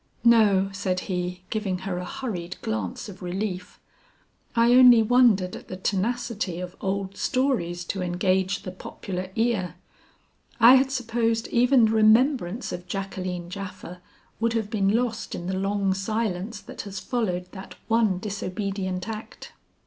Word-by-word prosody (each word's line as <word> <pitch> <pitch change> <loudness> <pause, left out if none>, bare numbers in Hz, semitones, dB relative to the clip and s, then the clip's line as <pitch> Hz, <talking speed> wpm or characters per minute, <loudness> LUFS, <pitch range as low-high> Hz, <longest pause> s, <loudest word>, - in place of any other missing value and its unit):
"No," 210 -5 +5
said 190 -2 -2
he, 180 -1 -4
giving 205 -4 -1
her 180 -2 -2
a 180 - -5
hurried 200 -9 -5
glance 110 - -3
of 195 -3 -11
relief, 180 0 -4 0.8
"I 235 +1 +5
only 250 -3 +8
wondered 220 -6 +4
at - - -11
the 185 - -6
tenacity 205 -1 -2
of 180 0 -6
old 195 0 -2
stories 230 -11 0
to 190 +2 -3
engage 185 +2 0
the 185 - -5
popular 185 0 -6
ear. 215 -7 0 0.8
I 235 +2 +9
had 265 0 +4
supposed 230 -3 -1
even 245 0 +4
the 220 - +1
remembrance 225 0 +3
of 180 0 -6
Jacqueline 185 -2 -4
Japha 185 -2 -8 0.4
would 230 0 +1
have 220 -2 -2
been 195 -3 +1
lost 230 +1 -1
in 175 - -6
the 190 +1 -2
long 195 0 0
silence 205 0 -2
that - - -8
has 200 -1 -6
followed 185 -8 -2
that 190 -1 -10
one 225 -4 +2
disobedient 195 -1 -3
act." 220 -1 -8
195 Hz, 145 wpm, -25 LUFS, 185-230 Hz, 0.8 s, I